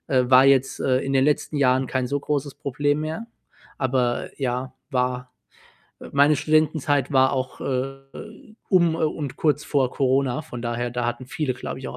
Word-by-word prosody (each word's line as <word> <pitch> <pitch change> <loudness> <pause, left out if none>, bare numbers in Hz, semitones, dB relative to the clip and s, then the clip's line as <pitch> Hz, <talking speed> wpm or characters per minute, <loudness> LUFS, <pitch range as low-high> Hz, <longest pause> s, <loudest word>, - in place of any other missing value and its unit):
Äh, 125 -2 +2
war 130 +1 +7
jetzt, 135 -1 +3
äh, 130 -1 +2
in 135 +1 -3
den 135 0 +3
letzten 150 +1 0
Jahren 130 -1 +2
kein 130 0 -1
so 140 +3 -1
großes 145 -1 -2
Problem 145 0 -1
mehr, 160 +9 -4 0.5
aber 130 -2 0
ja, 130 -1 -3 0.2
war 125 -1 -1 0.7
äh, - - -9
meine 145 +2 +4
Studentenzeit 150 -2 +1
war 130 0 +4
auch, 130 -1 -3
äh, 135 +1 -3 0.7
um, 175 -4 +4
äh, - - -4
und 150 -3 -3
kurz 150 -1 +1
vor 135 -4 +1
Corona. 135 +1 0
Von 120 -3 -8
daher, 120 +1 -2
da 120 0 -3
hatten 120 +2 -4
viele, 135 -2 -2
glaube - - -6
ich, 130 - -7
auch - - -8
135 Hz, 180 wpm, -23 LUFS, 125-145 Hz, 0.7 s, war